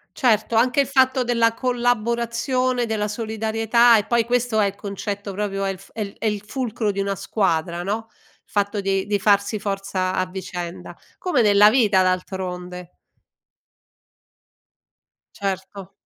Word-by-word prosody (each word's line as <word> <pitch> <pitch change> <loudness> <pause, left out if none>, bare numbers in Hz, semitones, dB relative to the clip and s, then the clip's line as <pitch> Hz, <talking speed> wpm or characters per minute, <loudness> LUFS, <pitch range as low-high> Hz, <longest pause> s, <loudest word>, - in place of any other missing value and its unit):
Certo, 225 -3 +2
anche 250 +5 +3
il 275 - +2
fatto 260 -1 +3
della 235 -2 +2
collaborazione, 245 +1 0
della 215 -2 -1
solidarietà 225 +2 +2
e 205 - -1
poi, 235 -1 +2
questo 245 -2 0
è 205 - +4
il 200 - -3
concetto 200 0 -5
proprio 195 0 -2
è 195 - 0
il 190 - -5
è 225 - -7
il 200 -1 -4
è - - -3
il 210 -2 -1
fulcro 225 -2 -2
di 200 - -5
una 195 0 -1
squadra, 175 -4 -1
no, 220 +3 -3
il - - -32
fatto 205 0 0
di 195 -1 -1
di 205 0 0
farsi 200 +1 +2
forza 195 -2 -2
a 185 - 0
vicenda. 180 -2 -7 0.2
Come 360 -9 +1
nella 205 0 +6
vita 215 -6 +4
d'altronde. 180 -1 -3 2.5
Certo. 195 -1 -5
210 Hz, 145 wpm, -22 LUFS, 195-235 Hz, 2.5 s, nella